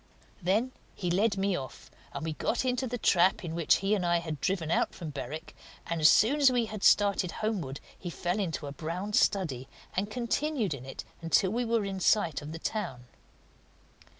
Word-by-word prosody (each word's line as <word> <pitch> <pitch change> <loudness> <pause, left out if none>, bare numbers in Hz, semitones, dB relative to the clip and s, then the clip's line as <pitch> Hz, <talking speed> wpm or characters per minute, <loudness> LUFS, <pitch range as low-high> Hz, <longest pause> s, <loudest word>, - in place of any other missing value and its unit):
Then 210 +8 +1 0.2
he 180 -3 -2
led 200 +3 +2
me 195 -1 +1
off, 130 -5 -8 0.2
and 140 +2 -5
we 160 - -2
got 235 +10 -1
into 255 +1 0
the 245 +1 -3
trap 185 -4 +3
in 160 - -4
which 170 -2 +3
he 200 - +3
and 200 -4 +1
I 175 0 +3
had 160 -4 -5
driven 175 -4 -1
out - - +1
from 165 -4 -6
Berwick, 145 +2 -7 0.3
and 170 -1 -2
as 155 - +8
soon 255 +9 +4
as 270 -2 +7
we 245 -2 +2
had 215 -2 -7
started 200 -3 +4
homeward 165 -11 -2 0.2
he 175 - -5
fell 175 +3 -2
into 165 -6 -2
a 140 - -5
brown 170 +8 -4
study 155 - +1 0.3
and 200 +3 -1
continued 240 - -1
in 130 -1 -8
it 135 - -7 0.2
until 185 +3 +2
we 240 +2 0
were 230 -2 +1
in 195 -1 -4
sight 170 -4 +2
of 145 +1 -7
the 165 - -5
town. 165 - -4
185 Hz, 200 wpm, -29 LUFS, 160-215 Hz, 0.3 s, as